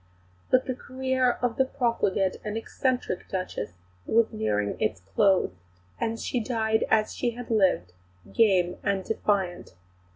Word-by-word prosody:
But 255 0 +4
the 260 - -1
career 260 0 0
of 240 -2 0
the 265 - +4
profligate 230 -8 0
and 215 +1 -3
eccentric 250 -3 -2
Duchess 185 - -3 0.3
was 230 0 +3
nearing 105 -1 -1
its 95 -4 0
close, 195 - +4 0.5
and 225 0 -1
she 250 - -1
died 220 -1 +1
as 215 -1 +3
she 240 -2 -1
had 245 -1 -7
lived, 185 - +2 0.4
game 185 -6 +3
and 200 -2 0
defiant. 190 - -1
220 Hz, 135 wpm, -27 LUFS, 185-245 Hz, 0.5 s, But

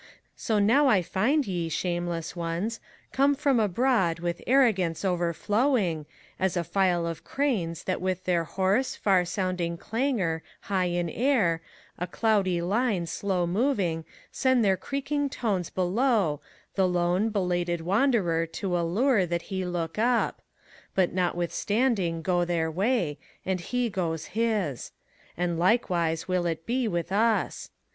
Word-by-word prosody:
So 220 - -1
now 235 +8 +4
I 200 -8 +4
find 260 - +1
ye, 175 -4 -2
shameless 175 -1 -2
ones, 175 +7 -3 0.3
come 280 +2 +3
from 280 -3 +2
abroad 210 -4 +2
With 170 0 -3
arrogance 205 -10 +3
overflowing, 180 - +1 0.3
as 190 -1 0
a 175 - +1
file 180 -2 +1
of 165 -1 -5
cranes 190 - -1
That 185 - -2
with 185 0 -1
their 175 -2 +1
hoarse, 195 - 0
far 190 -3 +2
sounding 180 -2 -2
clangor 220 - -1 0.2
high 190 -2 0
in 175 -1 -1
air, 200 - +1 0.4
ACT 180 0 -5
III. - - -20 0.4
141 220 +8 +1
A 220 - +1
dondy - - -3
liney - - -6
slow 185 -1 -1
moTing, 185 - 0 0.3
send 260 -4 +2
their 190 -1 +4
creakmg 280 +7 -2
tones 200 -10 -2
Belowy 190 - +1 0.3
the 190 -1 +2
k>ney 180 +4 +1
belated 175 -4 0
wanderer 185 -4 +2
to 180 +2 -3
allure 190 +5 +2
That 170 0 -1
he 190 0 -1
look 175 0 -3
up; 240 +1 +1 0.5
but, 185 -2 +2
nothwithstanding, 180 +1 0
go 175 +1 +2
their 170 -2 0
way, 185 - 0 0.3
And 190 -1 0
he 245 +6 -1
goes 165 -5 -2
his: 215 - -1 0.4
and 175 -1 -1
likewise 175 -5 +1
wiU 180 -2 0
it 160 0 -7
be, 245 0 0
with 175 -1 -2
ns. 220 +2 +1
185 Hz, 145 wpm, -27 LUFS, 170-225 Hz, 0.5 s, now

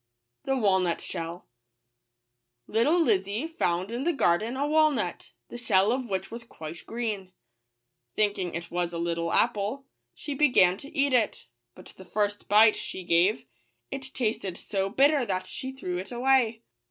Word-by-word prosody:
KKalnut 195 -9 +2
JHieU. 165 +1 -6 1.2
ITTLE 300 +11 +3
Lizzy 205 0 0
found 195 - -1
in 240 +3 -3
the 345 - +2
garden 225 - +1
a 280 - 0
wa 310 +1 +4
^ - - -2
nut 180 -7 -4
> - - -55
the 240 - -7
shell 200 -3 +3
of 250 -1 -2
which 190 +1 -3
was 235 +1 -7
quite 165 -7 -10
green. 215 -6 -4 0.8
Thinking 200 -5 0
it 170 0 -6
was 175 0 -2
a - - -3
little 170 0 -1
apple, 215 +7 0 0.3
she 290 - -5
began 250 -11 +4
to 280 +6 -11
eat 280 -1 +2
it; 235 -4 +1 0.3
but 185 - -13
the 190 - -12
first 205 0 -2
bite 215 +2 +6
she 185 - -6
gave, 175 +5 +2 0.5
it 275 - -4
tasted 215 -7 -2
so 195 -1 -2
bitter 280 +5 +3
that 185 -5 -2
she 260 - -6
threw 180 -10 -4
it 190 +4 -8
away. 240 -2 +2
215 Hz, 165 wpm, -27 LUFS, 185-260 Hz, 1.2 s, bite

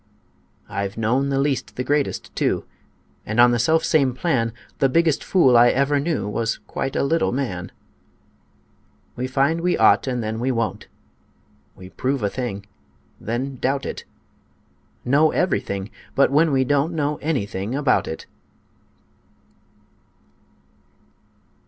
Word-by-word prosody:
I've 100 +1 -4
known 125 +5 +1
the 135 - 0
least 135 -1 -1
the 125 - -2
greatest, 145 +2 -1
too - - 0 0.6
And, 110 +3 -3
on 120 0 +7
the 120 - +1
selfsame 150 0 +2
plan, 130 -6 0 0.3
The 135 - +3
biggest 165 0 +2
fool 135 -10 +4
I 120 +1 +7
ever 140 +2 +2
knew 155 -6 -1
Was 115 +2 -1
quite 135 - -4
a - - +1
little 165 +4 +1
man: 100 -9 -3 1.4
We 125 +1 -3
find 140 +5 +1
we 180 +1 +1
ought, - - +4
and 125 -2 -1
then 110 +1 -3
we 130 +3 0
won't 115 -6 -2 0.9
We 90 0 -12
prove 130 -2 -2
a 100 - 0
thing, 110 -6 -4 0.5
then 130 +4 -3
doubt 135 +3 -1
it, - - -6 1.0
Know 145 +5 +4
everything 100 - -1 0.2
but 140 - +4
when 155 +3 +3
we 135 -1 +3
don't 145 +5 +1
Know 150 -1 -1
anything 110 -7 -3
about 145 -1 +1
it. 80 - -6
130 Hz, 135 wpm, -22 LUFS, 115-145 Hz, 1.4 s, on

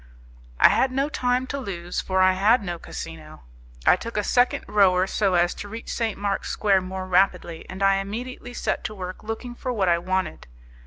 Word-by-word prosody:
I - - +8
had 265 - +2
no 275 +3 0
time 250 -2 0
to 280 +2 -4
lose, 175 -7 -4
for 190 0 0
I 185 0 +5
had 210 +5 +3
no 175 -2 -4
casino. 155 -2 -9 0.4
I - - +7
took 230 -1 -7
a 210 - +1
second 245 +4 +2
rower 185 -3 +4
so 195 -1 +1
as 175 0 +3
to 205 - -8
reach 225 +3 -6
St. 225 -3 -1
Mark's 200 -1 -2
Square 195 -2 +2
more 185 0 -5
rapidly, 180 -3 +1
and 190 +1 -4
I 195 0 +4
immediately 245 +5 -6
set - - -2
to 215 - -4
work 185 -1 -7
looking 225 +3 -5
for 255 +1 -4
what 200 -6 +1
I 170 0 +3
wanted. 185 - -2
195 Hz, 200 wpm, -24 LUFS, 185-230 Hz, 0.4 s, I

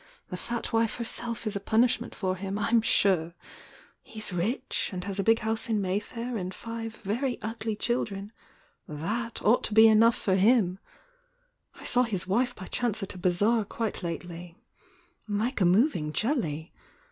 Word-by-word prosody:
The - - -2
fat 235 +6 -4
wife 225 -1 +2
herself 235 -1 -3
is 215 -1 -2
a - - 0
punishment 230 +3 +1
for 185 -2 -1
him, 195 +1 -4
Tm 225 +2 +2
sure! 175 -6 +2 0.7
He 220 - -11
s 210 -3 -2
rich, 195 +10 -1
and 180 -2 -4
has 200 +1 -4
a - - +2
big 225 +3 +5
house 220 +1 -2
in 220 -2 +2
Mayfair 215 +5 -3
and 185 -1 -4
five 225 0 -6
very 240 +6 -1
ugly 220 0 -3
children,— 210 -3 -2 0.6
t/iat 215 +11 -3
ought 230 +4 +4
to 210 - -2
be 220 0 +9
enough 225 +2 +6
for 190 - +1
himl 195 -2 +3 1.0
I - - -13
saw 245 - +3
his 210 -8 0
wife 245 +6 +1
by 185 - -8
chance 225 -2 -1
at 195 - -5
a 185 - -10
bazaar 205 +6 +2
quite 220 +2 -4
lately—like 180 - -6
a - - +5
moving 175 - +2
jelly 165 - -1
215 Hz, 165 wpm, -28 LUFS, 185-230 Hz, 1.0 s, be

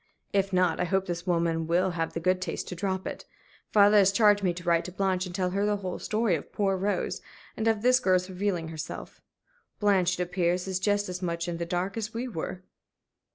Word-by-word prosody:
If 195 -1 +1
not, 180 -3 +2
I 180 - +1
hope 190 +2 0
this 175 -1 -4
woman 165 -2 +1
will 180 +3 +2
have 165 -2 -2
the - - -2
good 185 +2 +1
taste 180 -3 -4
to 180 - -5
drop 190 +1 -2
it. - - -5 0.5
Father 205 0 +6
has 195 -1 +6
charged 205 0 +4
me 185 -2 +2
to 175 +1 -7
write 170 -1 +2
to 180 - -6
Blanche 190 0 0
and 175 - -7
tell 185 -1 0
her 200 +2 0
the 210 0 +1
whole 185 -3 -5
story 220 -2 0
of 155 - -3
poor 195 -2 +1
Rose, 200 +2 -1 0.3
and 220 - -1
of 220 -1 +1
this 255 +1 +5
girl's 185 -5 +2
revealing 185 -3 -2
herself. 160 -1 -7 0.6
Blanche, 185 -4 +2
it - - +2
appears, 180 0 0
is 190 -1 -1
just 205 +1 +1
as 180 0 -5
much 170 -1 -2
in 170 -1 -3
the 170 0 -4
dark 180 +4 -2
as 220 0 -4
we 245 +3 -2
were." 185 -3 -5
185 Hz, 225 wpm, -28 LUFS, 175-200 Hz, 0.6 s, Father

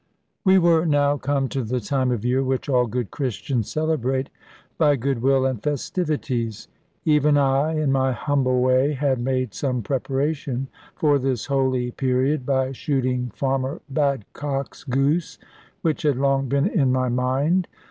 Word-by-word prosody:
We 190 -1 +5
were 170 -3 +4
now 145 -1 +2
come 140 -1 0
to 135 - -2
the 125 +3 -2
time 130 +3 0
of 120 -2 -2
year 125 +2 +2
which 130 -1 -1
all 125 -3 +2
good 120 -1 -3
Christians 125 -3 -2
celebrate 135 -4 -1 0.5
by 150 -3 +4
goodwill 135 +1 +1
and 130 -5 -1
festivities. 145 - -2 0.4
Even 150 -1 +4
I, 140 +3 +2
in 150 -3 +1
my 130 -1 +2
humble 130 -1 +1
way, 130 +3 +3
had 135 -2 0
made 130 -1 -1
some 125 -4 -2
preparation 135 +1 -2 0.3
for 145 -2 +2
this 130 -3 -1
holy 130 -3 0
period 130 +2 0
by 130 -1 +1
shooting 130 -2 -1
Farmer 135 +3 -1
Badcock's 140 0 -2
goose; 140 +5 0 0.5
which 160 -3 0
had 145 -4 +1
long 135 -1 +1
been 140 +3 +2
in 160 - +2
my 130 0 +1
mind. 135 +9 +1
135 Hz, 145 wpm, -23 LUFS, 130-145 Hz, 0.5 s, We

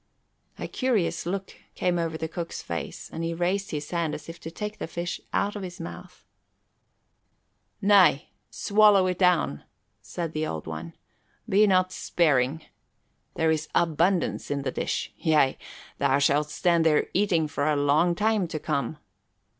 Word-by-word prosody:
A - - -5
curious 190 -11 0
look 195 +1 -3 0.2
came 175 -1 0
over 165 -1 -2
the 160 - -3
cook's 170 +1 -6
face 85 0 -5
and 165 - -4
he 165 0 -2
raised 185 +4 -1
his 150 -1 -5
hand 170 -3 -1
as 150 - -10
if 165 0 -9
to 165 - -7
take 210 +5 -6
the - - -4
fish 170 +1 -4
out 205 +1 0
of 205 - -5
his 180 -2 -7
mouth. 180 +2 -9 1.6
"Nay, 195 -8 +5 0.2
swallow 205 -2 +4
it 180 -1 -1
down," 175 - +2 0.4
said 165 -2 -5
the 155 0 -1
Old 80 -1 -5
One. 80 +1 -6 0.5
"Be 210 +2 +4
not 185 -1 +3
sparing. 150 -4 +1 0.7
There 160 0 +2
is 155 0 -2
abundance 170 +2 +1
in 140 -1 -2
the 130 - -2
dish. - - -3
Yea, 155 -5 +3 0.4
thou 135 - +3
shalt 145 +1 +2
stand 170 +1 +2
there 155 -2 +3
eating 180 -6 +2
for 145 -1 -2
a 155 - +2
long 150 +5 +3
time 210 -2 +1
to 160 - -4
come." 150 -1 -2
165 Hz, 160 wpm, -26 LUFS, 150-185 Hz, 1.6 s, Nay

